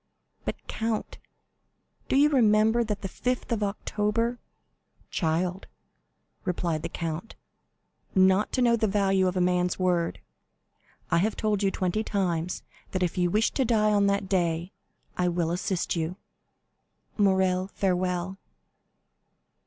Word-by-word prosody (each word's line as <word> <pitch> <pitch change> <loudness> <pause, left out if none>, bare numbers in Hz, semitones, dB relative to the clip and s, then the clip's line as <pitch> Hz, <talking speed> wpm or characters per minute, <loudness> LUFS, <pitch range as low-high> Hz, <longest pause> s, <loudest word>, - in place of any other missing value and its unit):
"But, - - -2
count, 225 -1 -3 0.9
do - - +2
you 290 +2 +6
remember 220 -2 +4
that 210 -2 -4
the - - -1
5th 250 +7 -3
of 225 -2 0
October——" 210 +3 -1 0.7
"Child," 180 +3 -1 0.8
replied 170 -4 -1
the - - -4
count, 165 +5 -5 0.8
"not 190 +2 +4
to 255 - +2
know 235 -1 +5
the 220 -1 +1
value 195 -2 +2
of 180 0 -1
a - - +2
man's 180 0 +1
word! 180 -2 0 0.9
I 170 - +4
have 210 +4 +1
told 210 -2 0
you 195 - +3
twenty 190 +3 -1
times 180 -5 -1 0.3
that 185 -1 0
if 175 - -1
you 180 -1 +2
wish 215 +5 +2
to 270 - +1
die 215 -3 +3
on 200 -1 +3
that 200 -1 0
day, 175 -1 0 0.5
I 180 - +3
will 170 -1 0
assist 180 +1 -1
you. 165 +1 -2 1.0
Morrel, 190 -2 +2
farewell!" 185 -1 -1
190 Hz, 135 wpm, -27 LUFS, 180-215 Hz, 1.0 s, you